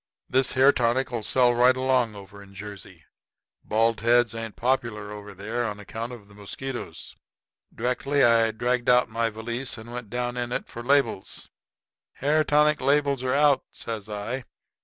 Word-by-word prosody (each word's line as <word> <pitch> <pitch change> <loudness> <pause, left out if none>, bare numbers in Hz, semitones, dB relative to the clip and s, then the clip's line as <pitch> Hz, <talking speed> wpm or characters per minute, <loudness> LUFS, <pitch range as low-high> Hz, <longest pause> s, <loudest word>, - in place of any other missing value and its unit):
This 130 +1 +1
hair 135 +1 +6
tonic'll 120 -1 0
sell 125 +2 +3
right 125 +2 +4
along 130 -4 +1
over 100 0 -12
in 100 0 -15
Jersey. 100 -4 -10 0.6
Bald 115 +1 +1
heads 120 +1 +3
ain't 115 -1 -6
popular 115 -5 -1
over 105 -1 -9
there 110 +5 -3
on 105 -1 -5
account 110 +4 -6
of 115 -5 -11
the 105 - -18
mosquitoes." 120 +6 -7 0.6
Directly 130 +4 0
I 115 -1 +5
dragged 120 +2 -1
out 125 0 +4
my 115 0 0
valise 115 +4 -4
and 115 +2 -10
went 120 -4 -6
down 120 +1 -3
in 120 0 -3
it - - -3
for 120 - -8
labels. 125 -6 0 0.6
"Hair 155 +3 +1
tonic 150 +1 +3
labels 140 0 +2
are 130 +1 0
out," 145 -1 +4
says 110 -2 -6
I. 115 +5 -4
120 Hz, 160 wpm, -25 LUFS, 110-130 Hz, 0.6 s, hair